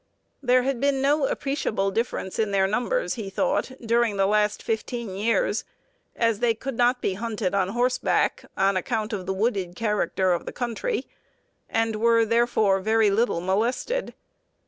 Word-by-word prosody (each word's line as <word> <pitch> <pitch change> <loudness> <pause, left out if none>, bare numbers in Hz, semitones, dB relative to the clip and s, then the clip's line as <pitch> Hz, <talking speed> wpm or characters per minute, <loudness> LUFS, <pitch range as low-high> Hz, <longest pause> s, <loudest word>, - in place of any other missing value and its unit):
There 255 -1 +3
had 265 -2 -1
been 280 -1 +2
no 280 +1 +2
appreciable 220 -8 -1
difference 225 -3 -3
in 215 -2 +1
their 195 -1 +2
numbers, 245 - 0
he 220 -6 -5
thought, 195 - 0
during 230 -2 +2
the 195 - +3
last 210 +1 +1
fifteen 225 -2 -3
years, 230 - +1 0.5
as 230 -3 +1
they 235 -2 +2
could 265 +3 -5
not 245 +1 +2
be 195 - +1
hunted 210 -2 -3
on 195 -2 +2
horseback, 245 +4 +1
on 195 0 +3
account 215 +3 -2
of 185 -3 -4
the 190 - 0
wooded 195 -4 -1
character 205 -3 +1
of 175 - -3
the - - -5
country, 250 - -2 0.6
and 225 -1 0
were, 230 +1 +4
therefore, 220 -4 +2
very 220 +1 +3
little 215 -4 +1
molested. 235 - -1
225 Hz, 160 wpm, -25 LUFS, 200-245 Hz, 0.6 s, were